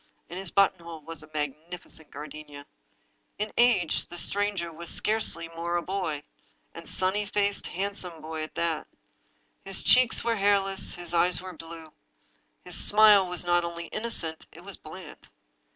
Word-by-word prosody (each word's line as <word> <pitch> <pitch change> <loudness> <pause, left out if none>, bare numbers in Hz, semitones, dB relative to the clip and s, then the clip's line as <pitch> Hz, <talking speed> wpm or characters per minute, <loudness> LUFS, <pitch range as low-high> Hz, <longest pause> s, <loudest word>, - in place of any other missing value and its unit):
In 175 - -7
his 190 -2 -1
button 195 -1 +3
hole 170 -2 -10
was 165 +1 -5
a 155 - -13
magnificent 155 +2 -6
gardenia. 145 -1 -10 0.7
In 210 +1 -4
age 230 -9 +2
the 175 - -10
stranger 200 -2 -1
was 170 +1 -6
scarcely 210 -6 +1
more 170 +1 -4
than 175 - 0
a - - -18
boy, 180 -7 -3 0.5
and - - -10
a - - -5
sunny 190 +3 0
faced, 205 0 -1
handsome 185 -3 -4
boy 160 0 -6
at 155 - -7
that. 165 -2 -2 0.8
His 195 0 -1
cheeks 250 -1 +5
were 230 -1 0
hair 200 0 +4
less, 195 0 +4
his 175 -1 -5
eyes 175 0 +7
were 185 0 -8
blue. 165 -1 -11 0.7
His 180 -1 +2
smile 210 -2 +6
was 180 -1 0
not 175 0 +2
only 170 0 -5
innocent, 215 -8 -4
it 170 - -14
was 200 -1 -4
bland. 155 0 -12
175 Hz, 170 wpm, -27 LUFS, 160-200 Hz, 0.8 s, eyes